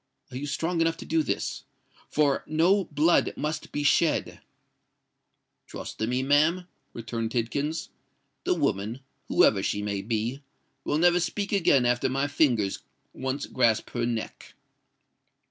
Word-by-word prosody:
Are 125 Hz, -, -5 dB
you 145 Hz, +2 st, -4 dB
strong 165 Hz, +4 st, -1 dB
enough 165 Hz, 0 st, +1 dB
to -, -, -9 dB
do 165 Hz, 0 st, +1 dB
this?—for 145 Hz, -1 st, -2 dB
no 180 Hz, +5 st, +3 dB
blood 160 Hz, +3 st, +2 dB
must 150 Hz, +1 st, -3 dB
be 145 Hz, -, -2 dB
shed." 155 Hz, +3 st, +2 dB, 1.3 s
"Trust -, -, -8 dB
to 110 Hz, -, 0 dB
me, 125 Hz, +2 st, 0 dB
ma'am," 155 Hz, +6 st, +3 dB, 0.3 s
returned 115 Hz, 0 st, -4 dB
Tidkins. 140 Hz, +7 st, -2 dB, 0.5 s
"The -, -, +1 dB
woman—whoever 115 Hz, +7 st, +1 dB
she 105 Hz, -, -1 dB
may 100 Hz, -1 st, -2 dB
be—will 130 Hz, +6 st, -4 dB
never 175 Hz, +2 st, +4 dB
speak 200 Hz, +4 st, -2 dB
again 155 Hz, -10 st, +3 dB
after 120 Hz, +2 st, +1 dB
my 135 Hz, +2 st, 0 dB
fingers 125 Hz, -9 st, +1 dB, 0.3 s
once 130 Hz, +1 st, -3 dB
grasp 115 Hz, -4 st, +1 dB
her 120 Hz, -1 st, -1 dB
neck." 115 Hz, -2 st, -5 dB
140 Hz, 130 wpm, -27 LUFS, 120-160 Hz, 1.3 s, never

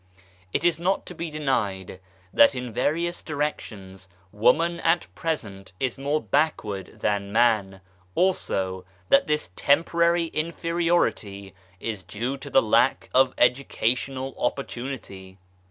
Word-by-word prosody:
It -, -, -1 dB
is 170 Hz, -2 st, +2 dB
not 185 Hz, +3 st, 0 dB
to -, -, -8 dB
be 170 Hz, -1 st, -5 dB
denied 105 Hz, -12 st, -2 dB, 0.3 s
that -, -, +6 dB
in 125 Hz, -2 st, -5 dB
various 170 Hz, +8 st, -1 dB
directions 100 Hz, -, -5 dB, 0.2 s
woman 150 Hz, +11 st, +2 dB
at 165 Hz, +1 st, +2 dB
present 100 Hz, -, -4 dB
is 130 Hz, -1 st, -2 dB
more 145 Hz, +3 st, 0 dB
backward 110 Hz, -, -1 dB
than 100 Hz, -1 st, -1 dB
man, 105 Hz, -4 st, +2 dB, 0.3 s
also 95 Hz, -, 0 dB, 0.3 s
that -, -, +5 dB
this 150 Hz, -11 st, -1 dB
temporary 170 Hz, +3 st, +3 dB
inferiority 165 Hz, -, -1 dB, 0.3 s
is 110 Hz, -2 st, -4 dB
due 120 Hz, +8 st, -4 dB
to 140 Hz, +1 st, -9 dB
the 135 Hz, -, +4 dB
lack 115 Hz, +4 st, +2 dB
of 130 Hz, 0 st, +4 dB
educational 130 Hz, +1 st, 0 dB
opportunity. 120 Hz, -7 st, -4 dB
130 Hz, 120 wpm, -25 LUFS, 100-160 Hz, 0.3 s, that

